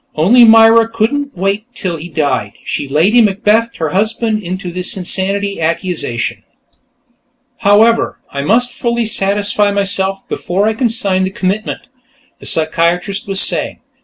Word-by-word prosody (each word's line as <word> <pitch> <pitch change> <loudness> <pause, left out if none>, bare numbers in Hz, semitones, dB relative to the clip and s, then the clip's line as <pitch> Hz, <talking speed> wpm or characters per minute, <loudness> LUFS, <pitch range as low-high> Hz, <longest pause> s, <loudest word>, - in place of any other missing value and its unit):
Only 230 +11 +5
Myra 225 0 +6
couldn't 230 +3 -2
wait 195 +4 -2
till 180 -7 -3
he 165 +3 -9
died; 140 -9 -2
she'd 140 - -4
Lady 185 - +3
Macbethed 220 +2 +1
her 160 -2 -2
husband 215 +3 -1
into 185 -1 -5
this 180 +2 -1
insanity 195 +1 0
accusation. 160 -7 -2 0.6
"... - - -47
however, 225 +3 +3
I 140 - -4
must 235 +11 +1
fully 235 -1 -1
satisfy 205 0 0
myself, 195 -1 -1
before 195 +4 -1
I 220 - +1
can 235 +1 0
sign 195 -4 0
the 190 - -1
commitment," 195 +3 -3 0.6
the - - -7
psychiatrist 170 +5 0
was 195 -1 +1
saying. - - -1
200 Hz, 140 wpm, -14 LUFS, 180-220 Hz, 0.6 s, Myra